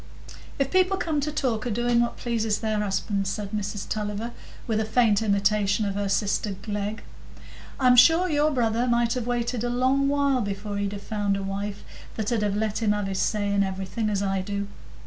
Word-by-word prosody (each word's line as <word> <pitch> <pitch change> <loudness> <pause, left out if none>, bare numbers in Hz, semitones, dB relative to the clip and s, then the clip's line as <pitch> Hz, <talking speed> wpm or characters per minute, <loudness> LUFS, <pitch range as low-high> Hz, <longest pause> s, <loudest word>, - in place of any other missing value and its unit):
"If 275 -1 0
people 370 +1 +3
come 310 -5 -1
to 300 +2 -2
talk 250 -6 -1
o' - - -1
doing 240 +1 +2
what 235 - -1
pleases 225 -3 -1
their 215 -1 -1
husbands," 195 -1 -1
said 200 0 -4
Mrs 205 -1 -3
Tulliver, 210 +2 -3 0.3
with 220 -2 0
a - - +1
faint 220 -1 +3
imitation 205 0 +2
of 200 - -1
her 200 0 -2
sister 200 0 0
Glegg, 205 +1 -4 0.8
"I'm 250 -2 +5
sure 330 +8 +6
your 300 -2 +2
brother 240 -3 +1
might 235 -1 +2
have 245 -2 -3
waited 240 -1 -1
a 240 - 0
long 260 +3 +2
while 280 -2 +2
before 200 0 -4
he'd 200 0 -2
have 200 0 -7
found 205 -2 -1
a 195 - -4
wife 200 +1 -4 0.3
that 220 +1 -2
'ud 230 -3 +1
have 205 -1 0
let 215 +1 -1
him 210 -2 +3
have 205 -1 -2
his 195 -1 -2
say 205 -2 0
in 200 - +3
everything, 195 +3 -2
as 200 -1 0
I 195 -1 0
do. 200 +1 -3
215 Hz, 205 wpm, -25 LUFS, 200-240 Hz, 0.8 s, sure